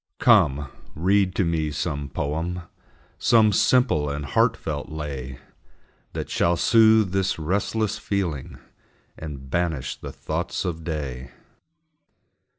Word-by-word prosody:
Come, 70 Hz, +1 st, +4 dB, 0.3 s
read 95 Hz, +3 st, +2 dB
to 95 Hz, -, +2 dB
me 80 Hz, -2 st, 0 dB
some 75 Hz, -1 st, -3 dB
poem, 80 Hz, +6 st, -3 dB, 0.6 s
Some 110 Hz, -3 st, +4 dB
simple 110 Hz, -, +3 dB
and 70 Hz, 0 st, -4 dB
heartfelt 70 Hz, -, 0 dB
lay, 70 Hz, -4 st, -6 dB, 0.8 s
That -, -, -4 dB
shall 85 Hz, 0 st, +1 dB
soothe 110 Hz, -3 st, +5 dB
this 95 Hz, 0 st, 0 dB
restless 100 Hz, +6 st, -1 dB
feeling, 90 Hz, -11 st, -3 dB, 0.6 s
And 70 Hz, -4 st, -8 dB
banish 85 Hz, -6 st, -1 dB
the -, -, -8 dB
thoughts -, -, -3 dB
of 85 Hz, -2 st, -3 dB
day. 70 Hz, -6 st, -4 dB
80 Hz, 110 wpm, -24 LUFS, 75-95 Hz, 0.8 s, soothe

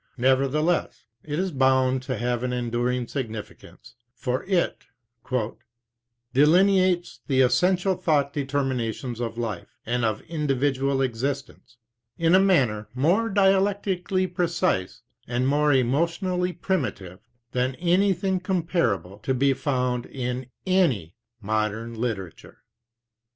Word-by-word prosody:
Nevertheless, 135 Hz, +6 st, +1 dB, 0.2 s
it 150 Hz, -1 st, -4 dB
is 185 Hz, +1 st, -1 dB
bound 130 Hz, -2 st, +2 dB
to 130 Hz, -2 st, -4 dB
have 120 Hz, 0 st, -1 dB
an 125 Hz, 0 st, -2 dB
enduring 120 Hz, 0 st, -1 dB
significance, 115 Hz, -6 st, -7 dB, 0.2 s
for 125 Hz, 0 st, -2 dB
it 185 Hz, -3 st, 0 dB, 1.5 s
"delineates 180 Hz, +5 st, +3 dB
the 130 Hz, -2 st, +3 dB
essential 180 Hz, +8 st, +3 dB
thought 150 Hz, -6 st, +1 dB
determinations 130 Hz, -4 st, -2 dB
of 115 Hz, -1 st, -4 dB
life, 110 Hz, -7 st, -5 dB
and 120 Hz, +1 st, -1 dB
of 110 Hz, -1 st, 0 dB
individual 140 Hz, -3 st, 0 dB
existence, 130 Hz, 0 st, -4 dB, 0.4 s
in 165 Hz, +1 st, +2 dB
a 185 Hz, -, +7 dB
manner 130 Hz, -, +2 dB
more 180 Hz, -, +2 dB
dialectically 195 Hz, -2 st, +2 dB
precise 175 Hz, -, -1 dB, 0.2 s
and 125 Hz, +1 st, 0 dB
more 150 Hz, +1 st, +3 dB
emotionally 170 Hz, -, +1 dB
primitive 120 Hz, -, -3 dB, 0.3 s
than 125 Hz, +1 st, 0 dB
anything 185 Hz, +2 st, +1 dB
comparable 170 Hz, -, -1 dB
to 130 Hz, +5 st, -1 dB
be 135 Hz, +2 st, +3 dB
found 125 Hz, -3 st, -1 dB
in 125 Hz, -1 st, -4 dB, 0.2 s
any 145 Hz, -, +1 dB, 0.3 s
modern 110 Hz, +2 st, -1 dB
literature." 110 Hz, -7 st, -5 dB
135 Hz, 110 wpm, -25 LUFS, 120-175 Hz, 1.5 s, a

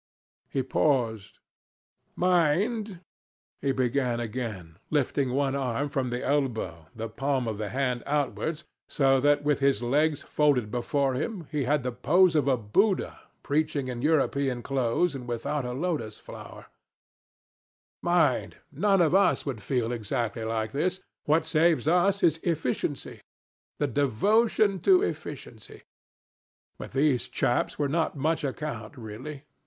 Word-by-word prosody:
He 135 Hz, -, -1 dB
paused. 120 Hz, -7 st, 0 dB, 0.8 s
"Mind," 185 Hz, +4 st, +1 dB, 0.6 s
he 140 Hz, -, +1 dB
began 130 Hz, -1 st, 0 dB
again, 105 Hz, -8 st, -5 dB
lifting 140 Hz, -2 st, 0 dB
one 135 Hz, +1 st, 0 dB
arm 135 Hz, +1 st, -1 dB
from 135 Hz, -3 st, -1 dB
the 125 Hz, +1 st, -3 dB
elbow, 110 Hz, -, -1 dB
the 115 Hz, 0 st, -4 dB
palm 135 Hz, +2 st, -1 dB
of 110 Hz, -2 st, -3 dB
the 105 Hz, -1 st, -3 dB
hand 125 Hz, -2 st, -1 dB
outwards, 150 Hz, +2 st, -1 dB, 0.3 s
so 135 Hz, -2 st, +3 dB
that, 145 Hz, +2 st, +3 dB
with 145 Hz, -1 st, +1 dB
his 135 Hz, -4 st, +2 dB
legs 145 Hz, +4 st, +1 dB
folded 135 Hz, -8 st, +1 dB
before 135 Hz, +2 st, 0 dB
him, 175 Hz, -, -3 dB
he 150 Hz, -4 st, -1 dB
had 145 Hz, +1 st, +1 dB
the 125 Hz, -, -2 dB
pose 160 Hz, +9 st, +3 dB
of 145 Hz, -3 st, +2 dB
a 130 Hz, -2 st, +3 dB
Buddha 185 Hz, -, +1 dB, 0.2 s
preaching 150 Hz, -2 st, 0 dB
in 120 Hz, -1 st, -4 dB
European 140 Hz, -4 st, +1 dB
clothes 135 Hz, +5 st, 0 dB
and 125 Hz, -3 st, -7 dB
without 120 Hz, +4 st, -2 dB
a 125 Hz, -, -3 dB
lotus 145 Hz, -7 st, -3 dB
flower -, -, -11 dB, 1.4 s
"Mind, 170 Hz, -7 st, +1 dB
none 195 Hz, +6 st, +2 dB
of 160 Hz, -, +2 dB
us 195 Hz, +1 st, +3 dB
would 130 Hz, -7 st, -4 dB
feel 120 Hz, +2 st, -1 dB
exactly 115 Hz, 0 st, -2 dB
like 110 Hz, -1 st, -2 dB
this. 180 Hz, +6 st, -1 dB, 0.3 s
What 155 Hz, +3 st, +2 dB
saves 160 Hz, -1 st, +2 dB
us 180 Hz, +4 st, +3 dB
is 165 Hz, -2 st, +3 dB
efficiency 150 Hz, -4 st, -2 dB, 0.6 s
the 145 Hz, -, +1 dB
devotion 195 Hz, -, +2 dB
to 375 Hz, -, +5 dB
efficiency. -, -, -6 dB, 1.0 s
But -, -, -8 dB
these 135 Hz, -2 st, +2 dB
chaps 120 Hz, -, 0 dB
were 145 Hz, -, +1 dB
not 160 Hz, +1 st, -1 dB
much 155 Hz, +3 st, 0 dB
account, 135 Hz, -4 st, -5 dB
really. 125 Hz, +6 st, -8 dB
140 Hz, 140 wpm, -27 LUFS, 120-155 Hz, 1.4 s, to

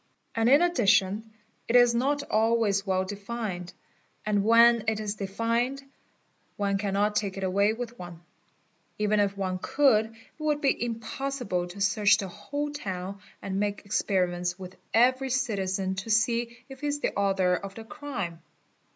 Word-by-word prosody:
And 230 Hz, +1 st, +2 dB
in 285 Hz, +6 st, +6 dB
addition 220 Hz, -, +2 dB, 0.4 s
it 235 Hz, -, 0 dB
is 245 Hz, -1 st, +6 dB
not 280 Hz, +4 st, +1 dB
always 220 Hz, -4 st, +1 dB
well 190 Hz, 0 st, +1 dB
defined 200 Hz, -3 st, -5 dB, 0.5 s
and 205 Hz, -1 st, +1 dB
when 230 Hz, 0 st, +6 dB
it 220 Hz, -1 st, +1 dB
is 210 Hz, -2 st, -2 dB
defined 230 Hz, +7 st, -1 dB, 0.7 s
one 200 Hz, -1 st, 0 dB
cannot 205 Hz, +1 st, 0 dB
take 200 Hz, -2 st, -1 dB
it 195 Hz, -, -4 dB
away 200 Hz, +3 st, +2 dB
with 240 Hz, +1 st, -7 dB
one; 175 Hz, -2 st, -9 dB, 0.8 s
even 210 Hz, 0 st, +1 dB
if 200 Hz, -1 st, +1 dB
one 185 Hz, -2 st, -2 dB
could, 260 Hz, -7 st, +3 dB
it 225 Hz, -, -18 dB, 0.2 s
would 305 Hz, -1 st, 0 dB
be 275 Hz, -4 st, +1 dB
impossible 235 Hz, -4 st, -3 dB
to 190 Hz, +3 st, -9 dB
search 210 Hz, 0 st, +4 dB
the 195 Hz, -3 st, -4 dB
whole 285 Hz, +11 st, -4 dB
town 195 Hz, -8 st, -5 dB, 0.2 s
and 195 Hz, 0 st, -2 dB
make 205 Hz, 0 st, -2 dB
experiments 180 Hz, -3 st, 0 dB
with 185 Hz, -1 st, -9 dB, 0.2 s
every 255 Hz, +4 st, +3 dB
citizen 195 Hz, -7 st, -1 dB
to 195 Hz, +4 st, -6 dB
see 235 Hz, +2 st, +1 dB
if 265 Hz, -1 st, -12 dB
he 295 Hz, -, -2 dB
is 290 Hz, 0 st, -2 dB
the -, -, -1 dB
author 195 Hz, -2 st, +2 dB
of 195 Hz, +1 st, -4 dB
the 225 Hz, -, -8 dB
crime. 220 Hz, -, -6 dB
210 Hz, 160 wpm, -27 LUFS, 195-240 Hz, 0.8 s, in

